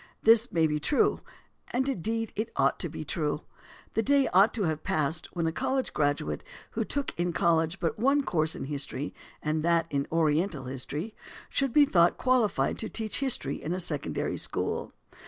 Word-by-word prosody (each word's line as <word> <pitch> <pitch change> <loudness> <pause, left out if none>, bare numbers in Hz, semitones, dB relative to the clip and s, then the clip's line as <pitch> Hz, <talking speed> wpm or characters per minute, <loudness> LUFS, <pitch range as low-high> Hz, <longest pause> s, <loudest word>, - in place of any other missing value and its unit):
This 230 +2 +5
may 165 -4 +3
be 150 -1 0
true; 280 - +2 0.5
and 260 +2 0
indeed 225 -1 -2 0.2
ought - - +2
to - - -1
be - - -7
true. - - -1 0.5
The 225 - +2
day 275 +3 +3
ought 195 +4 +5
to 215 - 0
have 155 -3 -1
passed 155 +1 -1
when 170 -1 0
a 160 - +1
college 265 +9 -1
graduate 145 - -1 0.3
who 225 - -1
took 280 +5 -2
in 175 0 0
college 165 +1 +2
but 170 +2 -2
one 275 +4 +3
course 160 -8 +1
in - - -5
history, 140 0 -3 0.3
and 155 +1 0
that 170 0 +2
in 140 -1 -1
Oriental 160 -1 +1
history, 140 - -5 0.4
should 275 -2 0
be 290 +3 +6
thought 175 -8 +3
qualified 230 - +1
to 220 - -2
teach 220 -2 -1
history 250 - 0
in 165 - -3
a 185 - -2
secondary 145 - -1
school. - - -2
170 Hz, 175 wpm, -28 LUFS, 155-225 Hz, 0.5 s, be